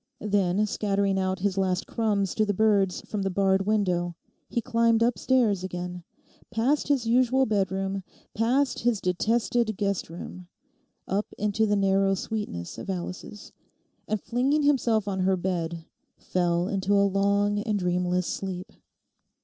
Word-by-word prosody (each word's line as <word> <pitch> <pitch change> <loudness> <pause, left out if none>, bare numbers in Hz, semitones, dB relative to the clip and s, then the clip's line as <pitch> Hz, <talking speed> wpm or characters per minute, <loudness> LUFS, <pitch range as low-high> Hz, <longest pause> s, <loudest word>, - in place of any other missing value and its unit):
Then, 205 -1 +1
scattering 200 -2 0
out 190 0 -1
his 195 -1 0
last 185 -1 0
crumbs 205 -4 0
to 215 - +2
the 205 -2 0
birds 200 -3 +2
from 210 - -4
the 195 - 0
barred 195 +1 +1
window, 180 -5 +1 0.3
he - - 0
climbed 230 0 +2
upstairs 230 -3 +2
again, 180 -1 -5 0.5
past 240 +6 +1
his 275 -5 +1
usual 255 +3 +3
bedroom, 195 -2 -1 0.3
past 250 +5 +1
his 235 -3 +1
detested 220 +4 0
guest 200 -4 -1
room, 175 +1 -9 0.6
up 200 +3 -1
into 210 +1 +1
the 205 - +2
narrow 195 0 +2
sweetness 195 - -5
of - - -7
Alice's, 180 +2 -6 0.6
and 215 0 -1
flinging 260 +8 +1
himself 235 -7 +2
on 190 -1 -2
her 190 0 +2
bed 170 -2 -3 0.3
fell 175 -1 0
into 195 0 0
a 200 0 +4
long 200 +1 +2
and 210 0 -1
dreamless 180 -1 0
sleep. 185 +1 -5
200 Hz, 140 wpm, -26 LUFS, 185-220 Hz, 0.6 s, a